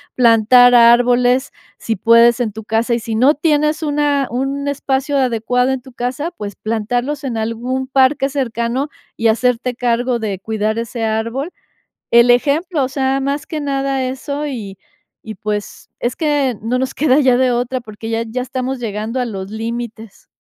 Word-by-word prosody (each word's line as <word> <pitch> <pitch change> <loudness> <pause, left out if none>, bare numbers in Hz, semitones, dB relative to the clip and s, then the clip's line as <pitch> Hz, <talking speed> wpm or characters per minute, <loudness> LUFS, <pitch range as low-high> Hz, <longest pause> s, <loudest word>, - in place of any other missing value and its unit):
plantar 245 +1 +6
árboles, 245 +2 +4 0.3
si 225 - -2
puedes 230 +3 +5
en 235 -3 -1
tu 220 +2 -8
casa, 225 +2 0
y 235 - -2
si 225 0 -4
no 260 +6 +4
tienes 300 +1 +1
una 290 -2 +1
un 270 +3 -2
espacio 275 0 -1
adecuado 250 0 +1
en 265 -1 -2
tu 260 +1 -14
casa, 250 +7 -3
pues, 205 - -7
plantarlos 245 +6 -2
en 245 -4 -3
algún 240 +4 -2
parque 270 +1 +2
cercano, 255 0 -2 0.3
y 230 - +1
hacerte 250 +2 +1
cargo 245 0 0
de 205 -4 -3
cuidar 220 +2 -2
ese 230 0 -4
árbol. 230 +8 -2 0.6
El 235 +1 +6
ejemplo, 290 +5 +1
o 260 - -2
sea, 270 0 0
más 280 +1 -2
que 310 -2 -4
nada 275 -1 -1
eso 280 +3 -4
y 210 -8 -6 0.5
y 220 -2 -7
pues, 210 +1 -5
es 240 +1 -2
que 290 -5 0
no 245 +3 -1
nos 260 0 -2
queda 285 -1 +3
ya 260 -4 +4
de 255 -1 +2
otra 245 +1 -1
porque 220 0 -9
ya 230 0 -1
ya 235 +3 -4
estamos 260 0 -4
llegando 220 +2 -3
a 250 - 0
los 195 -4 -6
límites. 225 -1 -6
245 Hz, 170 wpm, -17 LUFS, 230-270 Hz, 0.6 s, plantar